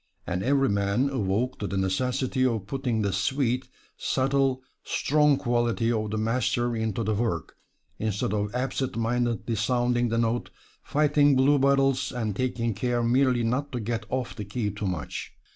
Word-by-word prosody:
And 90 +1 -2
every 135 +4 +2
man 100 +7 +1
awoke 120 +1 -1
to 100 - -2
the 100 - -3
necessity 125 +7 0
of 115 -6 0
putting 125 -3 -1
the 100 -2 0
sweet, 125 +5 0 0.3
subtile, 135 -1 +1 0.2
strong 150 -1 +2
quality 120 -1 +1
of 110 -2 -1
the 110 - -2
master 120 +1 0
into 110 0 -1
the 110 +1 0
work, 105 -6 -2 0.4
instead 105 -2 -1
of 105 +2 -2
absent 130 0 -2
mindedly 115 0 0
sounding 120 +2 +1
the 115 - 0
note, 115 +1 0 0.3
fighting 145 -1 +3
bluebottles, 135 -1 +3
and 110 -5 -2
taking 120 -2 -1
care 120 +3 -1
merely 125 0 +3
not 130 +5 -1
to 125 - -1
get 115 0 -3
off 130 -1 -2
the 105 - -5
key 105 +1 -2
too 105 0 -4
much. 90 -6 -4
120 Hz, 160 wpm, -26 LUFS, 110-130 Hz, 0.4 s, fighting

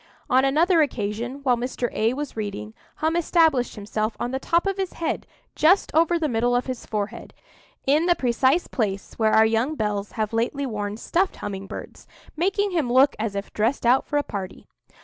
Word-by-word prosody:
On 260 +1 +5
another 320 +5 +4
occasion, 240 0 -2
while 250 -3 +3
Mr. 245 0 -2
A 225 +3 +1
was 290 0 -5
reading, 200 - -5 0.2
Hum 320 +2 0
established 320 -7 +2
himself 215 +1 -3
on 240 - -2
the 265 - -2
top 340 +6 +1
of 390 0 -1
his 380 -2 -3
head 330 - -3 0.3
just 365 +6 +3
over 335 +2 +3
the 320 -2 0
middle 240 -1 +1
of 245 - +1
his 255 -2 -6
forehead, 210 -1 -4 0.5
in 300 +5 +3
the 350 - +4
precise 260 +5 +2
place 200 -5 -3
where 220 -1 +3
our 220 - +6
young 225 +7 +1
belles 210 -4 -2
have 215 -1 -2
lately 240 +5 -1
worn 210 -4 -4
stuffed 365 +10 0
humming 195 -1 -6
birds, - - -9 0.3
making 390 +5 0
him 310 -9 0
look 265 +3 +5
as 215 -2 -2
if 200 0 -5
dressed 230 +5 0
out 250 +3 +4
for 290 - 0
a 290 - +2
party. 195 -6 -6
250 Hz, 190 wpm, -24 LUFS, 215-310 Hz, 0.5 s, our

